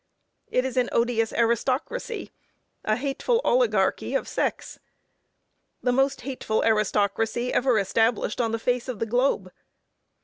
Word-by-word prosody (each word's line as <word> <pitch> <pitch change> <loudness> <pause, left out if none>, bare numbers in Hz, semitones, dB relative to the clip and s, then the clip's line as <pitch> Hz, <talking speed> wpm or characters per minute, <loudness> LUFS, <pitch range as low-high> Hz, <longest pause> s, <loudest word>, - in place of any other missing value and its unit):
It 255 - +1
is 260 -1 -4
an 250 -1 +2
odious 230 -1 +1
aristocracy; 260 - -1 0.5
a 215 - +1
hateful 280 - 0
obligarchy - - +2
of - - 0
sex. - - -3 1.0
The 250 - +2
most 270 +1 +1
hateful 250 -5 -2
aristocracy 220 +2 +1
ever 255 -3 +3
established 225 +3 +1
on 225 -2 0
the 225 - 0
face 245 +2 -1
of 255 -4 -4
the 225 - -1
globe. 230 -5 0
245 Hz, 130 wpm, -25 LUFS, 225-265 Hz, 1.0 s, ever